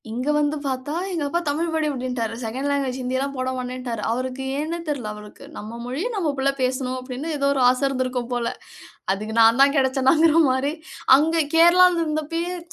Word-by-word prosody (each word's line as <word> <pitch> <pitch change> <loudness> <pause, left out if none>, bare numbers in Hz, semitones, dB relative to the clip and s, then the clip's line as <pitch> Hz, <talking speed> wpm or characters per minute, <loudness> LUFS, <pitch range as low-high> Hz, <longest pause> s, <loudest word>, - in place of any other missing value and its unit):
இங்க 250 +6 -3
வந்து 295 0 +1
பாத்தா 265 +2 -3 0.2
எங்க 330 -4 -2
அப்பா 340 +4 0
"தமிழ் 305 +4 0
படி" 315 -1 0
அப்டின்ட்டாரு. 250 -4 -3
செகண்ட் 260 +6 -3
லாங்குவேஜ் 275 -2 -1
ஹிந்தி 255 +1 -2
எல்லாம் 275 +1 -3
போட 255 0 -2
மாட்டேன்ட்டாரு. 250 -3 -5
அவருக்கு 255 +2 -3 0.2
ஏன்னே 325 +3 -3
தெரில 270 -8 -3
அவருக்கு. 210 0 -12
"நம்ம 220 +3 -7
மொழியை 265 - -3
நம்ம 340 -7 0
பிள்ள 270 +1 +2
பேசணும்" 255 0 -1
அப்டின்னு 260 +5 -5
ஏதோ 280 0 +1
ஒரு 270 - 0
ஆசை 255 +2 0
இருந்திருக்கும் 255 -2 -2
போல. 240 -1 -1 0.7
அதுக்கு 215 +3 -5
நான் 225 +2 +5
தான் 280 +1 +5
கிடைச்சேனாங்கிற 270 +4 +3 0.2
மாரி. 260 +3 0 0.4
அங்க 320 +3 +1 0.2
கேரளால 345 +1 +6
இருந்தப்பயும், 330 +3 -3
265 Hz, 175 wpm, -23 LUFS, 250-300 Hz, 0.7 s, கேரளால